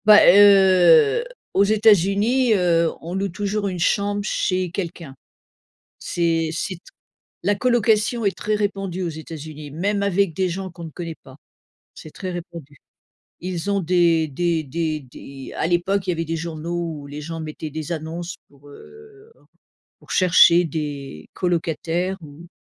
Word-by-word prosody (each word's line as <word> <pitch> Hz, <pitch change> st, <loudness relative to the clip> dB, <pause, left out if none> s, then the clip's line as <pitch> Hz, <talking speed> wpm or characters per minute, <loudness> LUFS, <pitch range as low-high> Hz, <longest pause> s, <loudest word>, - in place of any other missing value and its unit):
Bah, 210 Hz, 0 st, +9 dB
heu, 200 Hz, -, +6 dB, 0.3 s
aux 195 Hz, -, +4 dB
États-Unis, 215 Hz, +3 st, +3 dB
heu, 170 Hz, -3 st, +2 dB
on 170 Hz, +2 st, -7 dB
loue 195 Hz, +1 st, -1 dB
toujours 205 Hz, +2 st, -2 dB
une 185 Hz, -2 st, -3 dB
chambre 205 Hz, +4 st, 0 dB
chez 185 Hz, -3 st, -1 dB
quelqu'un. 170 Hz, -5 st, -6 dB, 0.8 s
C'est 165 Hz, -2 st, -1 dB
c'est 185 Hz, +3 st, -3 dB
t 170 Hz, -, -18 dB, 0.6 s
la 205 Hz, -, +2 dB
colocation 230 Hz, 0 st, +1 dB
est 195 Hz, -, 0 dB
très 215 Hz, -, -2 dB
répandue 195 Hz, -3 st, -2 dB
aux 175 Hz, -, -2 dB
États-Uni. 155 Hz, -2 st, -9 dB
Même 200 Hz, +6 st, -1 dB
avec 200 Hz, -3 st, +1 dB
des 190 Hz, +1 st, +1 dB
gens 190 Hz, +2 st, -5 dB
qu'on 170 Hz, 0 st, -11 dB
ne 160 Hz, -, -9 dB
connaît 165 Hz, 0 st, -6 dB
pas, 130 Hz, -, -14 dB, 0.6 s
c'est 155 Hz, -, -11 dB
très 185 Hz, +3 st, -6 dB
répandu. 170 Hz, -5 st, -9 dB, 0.6 s
Ils 180 Hz, +1 st, -4 dB
ont 200 Hz, 0 st, +1 dB
des 170 Hz, -2 st, +2 dB
des 165 Hz, +3 st, -1 dB
des 155 Hz, +2 st, -2 dB
des 135 Hz, 0 st, -11 dB
à -, -, 0 dB
l'époque 180 Hz, +3 st, 0 dB
il -, -, 0 dB
y -, -, +1 dB
avait 165 Hz, 0 st, -3 dB
des 165 Hz, +1 st, -3 dB
journaux 165 Hz, 0 st, -4 dB
où -, -, -10 dB
les 145 Hz, +1 st, -8 dB
gens 165 Hz, +2 st, -6 dB
mettaient 155 Hz, 0 st, -6 dB
des 155 Hz, +2 st, -5 dB
annonces 170 Hz, +2 st, -5 dB
pour, 145 Hz, 0 st, -20 dB
heu 435 Hz, -, -16 dB, 0.7 s
pour -, -, -14 dB
chercher 175 Hz, -1 st, +6 dB
des 145 Hz, -, -6 dB
colocataires 175 Hz, +1 st, -1 dB
ou 155 Hz, +2 st, -12 dB
175 Hz, 155 wpm, -22 LUFS, 160-200 Hz, 0.8 s, Bah